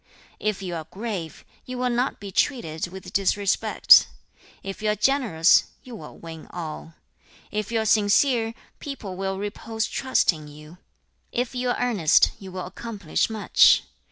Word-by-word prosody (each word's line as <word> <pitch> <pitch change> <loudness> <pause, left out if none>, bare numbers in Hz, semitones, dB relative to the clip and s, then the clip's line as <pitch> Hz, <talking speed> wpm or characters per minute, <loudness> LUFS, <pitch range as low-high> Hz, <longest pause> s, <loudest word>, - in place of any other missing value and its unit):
If 215 -2 -2
you 180 -2 -4
are 160 -2 -5
grave, 195 -6 -6 0.2
you 255 0 -7
will 250 0 0
not 245 +2 -1
be 200 -1 -8
treated 175 - -1
with 190 +1 -10
disrespect. 200 0 +4 0.6
If 195 +2 -7
you 215 - 0
are 210 - +2
generous, 210 - +3 0.2
you 250 -2 -10
will 155 -8 -11
win 165 -1 -10
all. 165 -1 -7 0.6
If 210 +1 -3
you 230 - +1
are - - -3
sincere, 225 +2 +3 0.2
people 240 -10 -7
will 195 0 -3
repose 220 +2 -4
trust 260 -8 +1
in 155 -2 -10
you. 150 +4 -14 0.5
If 245 +2 -2
you 250 0 -2
are - - 0
earnest, 210 -11 +3
you 190 -1 -10
will 185 0 -5
accomplish 200 -2 -3
much. 220 -2 +4
205 Hz, 155 wpm, -24 LUFS, 175-235 Hz, 0.6 s, disrespect